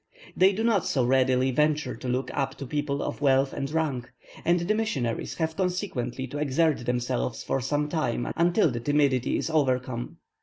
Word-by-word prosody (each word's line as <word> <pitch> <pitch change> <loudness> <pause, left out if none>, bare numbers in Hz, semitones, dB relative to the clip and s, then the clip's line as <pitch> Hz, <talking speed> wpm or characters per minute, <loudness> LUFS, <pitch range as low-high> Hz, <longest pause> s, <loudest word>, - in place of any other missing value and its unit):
They 190 +1 +5
do 210 +3 -2
not 220 -6 +3
so 130 -4 +1
readily 130 0 +3
venture 150 -1 +1
to 130 - -7
look 125 +2 -1
up 135 -1 -1
to 140 - -7
people 145 +1 -2
of - - -4
wealth 135 -1 +3
or - - -4
rank, 145 -7 -1 0.3
and 175 +1 +3
the 180 +5 +1
missionaries 145 - -2
have 160 -1 -2
consequently 175 - -2
to 145 +3 -6
exert 150 -2 +1
themselves 120 - -1
for 135 - -1
some 145 +3 0
time 150 -7 -1
until 170 -1 +3
this 120 -1 -4
timidity 140 -2 +2
is - - -2
overcome. 130 -5 0
140 Hz, 180 wpm, -27 LUFS, 125-160 Hz, 0.3 s, They